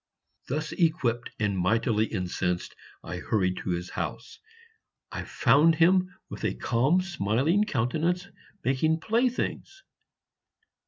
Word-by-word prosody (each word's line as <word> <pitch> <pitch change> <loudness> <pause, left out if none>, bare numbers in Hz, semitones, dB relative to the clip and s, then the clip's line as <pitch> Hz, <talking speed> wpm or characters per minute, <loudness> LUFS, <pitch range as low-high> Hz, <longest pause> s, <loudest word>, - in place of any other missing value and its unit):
Thus 150 +4 -2
equipped 130 -9 0
and 105 -2 +1
mightily 110 +4 +1
incensed, 90 -2 -2 0.3
I 90 - -5
hurried 95 0 0
to - - -5
his 90 0 -3
house. - - -5 0.7
I - - -4
found 160 +3 +4
him 185 +3 +4 0.2
with - - -9
a - - 0
calm 135 +10 +2
smiling 165 - +1
countenance 165 - 0 0.4
making 155 +5 +1
playthings. 250 - -1
135 Hz, 110 wpm, -27 LUFS, 105-175 Hz, 0.7 s, found